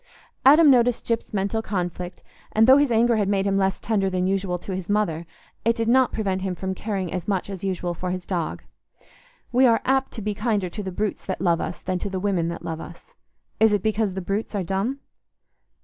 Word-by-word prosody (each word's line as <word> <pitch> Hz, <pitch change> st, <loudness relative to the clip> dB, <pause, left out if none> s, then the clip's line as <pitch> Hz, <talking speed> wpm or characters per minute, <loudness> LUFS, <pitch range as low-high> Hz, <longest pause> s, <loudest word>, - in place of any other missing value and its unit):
Adam 295 Hz, +2 st, +8 dB
noticed 245 Hz, -2 st, +3 dB
Gyp's 230 Hz, -1 st, -2 dB
mental 200 Hz, +2 st, -1 dB
conflict, 180 Hz, -3 st, -4 dB, 0.3 s
and 220 Hz, +1 st, +5 dB
though 260 Hz, +3 st, +8 dB
his 285 Hz, -3 st, +2 dB
anger 230 Hz, 0 st, +3 dB
had 205 Hz, -2 st, +1 dB
made 195 Hz, -1 st, +1 dB
him 200 Hz, -1 st, +1 dB
less 195 Hz, -1 st, +1 dB
tender 205 Hz, -3 st, 0 dB
than 185 Hz, -1 st, -1 dB
usual 190 Hz, -1 st, 0 dB
to 190 Hz, +2 st, -6 dB
his 185 Hz, 0 st, -6 dB
mother, 170 Hz, -6 st, 0 dB, 0.4 s
it 230 Hz, +1 st, +2 dB
did 230 Hz, -1 st, -1 dB
not 255 Hz, +2 st, +4 dB
prevent 190 Hz, -3 st, -1 dB
him 190 Hz, -1 st, -2 dB
from 190 Hz, +1 st, -3 dB
caring 190 Hz, -3 st, -3 dB
as 180 Hz, -3 st, -4 dB
much 200 Hz, -1 st, -1 dB
as 190 Hz, -1 st, -7 dB
usual 180 Hz, -2 st, -2 dB
for 180 Hz, +2 st, -4 dB
his 180 Hz, 0 st, -4 dB
dog. 175 Hz, -4 st, -3 dB, 0.9 s
We 255 Hz, +1 st, +5 dB
are 230 Hz, -1 st, +3 dB
apt 265 Hz, 0 st, +1 dB
to 220 Hz, -, -6 dB
be 210 Hz, 0 st, -1 dB
kinder 205 Hz, -3 st, -1 dB
to 210 Hz, -, -5 dB
the 190 Hz, -2 st, -5 dB
brutes 205 Hz, +2 st, -2 dB
that 190 Hz, -, -3 dB
love 170 Hz, -3 st, +2 dB
us -, -, -5 dB
than 185 Hz, -1 st, -2 dB
to 200 Hz, -, -4 dB
the 190 Hz, -1 st, -3 dB
women 185 Hz, -4 st, 0 dB
that 170 Hz, 0 st, -5 dB
love 160 Hz, -1 st, -4 dB
us. -, -, -12 dB, 0.5 s
Is 220 Hz, -1 st, +5 dB
it 205 Hz, -, +1 dB
because 215 Hz, -3 st, 0 dB
the 190 Hz, -, -3 dB
brutes 200 Hz, +4 st, -3 dB
are 195 Hz, -, 0 dB
dumb? 195 Hz, +10 st, -2 dB
195 Hz, 225 wpm, -24 LUFS, 185-225 Hz, 0.9 s, Adam